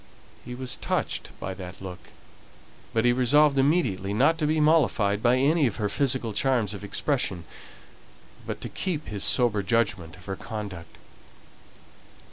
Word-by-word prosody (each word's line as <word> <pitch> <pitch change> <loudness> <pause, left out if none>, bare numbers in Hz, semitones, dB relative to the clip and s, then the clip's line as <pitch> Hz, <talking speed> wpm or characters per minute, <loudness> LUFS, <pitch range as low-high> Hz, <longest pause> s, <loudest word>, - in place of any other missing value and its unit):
He 125 0 -7
was 130 0 -3
touched - - -2
by 95 - -4
that 90 -1 -9
look, 95 -2 -9 0.8
but 115 +1 +1
he 120 - +5
resolved 140 +3 +4
immediately 120 - +1
not 160 +9 +3
to 150 - +1
be 155 +1 +1
mollified 145 -10 +3
by 120 +2 +4
any 145 +2 +3
of 110 - -3
her 105 -3 -1
physical 130 -2 0
charms 115 -3 +1
of 100 - -8
expression, 100 - -1 1.0
but - - -5
to - - -5
keep 170 -5 -3
to - - -9
his 100 -2 -3
sober 120 -5 +3
judgment 95 -6 0
of 90 - -16
her 95 - -4
conduct. 100 -6 -7
115 Hz, 155 wpm, -26 LUFS, 100-140 Hz, 1.0 s, he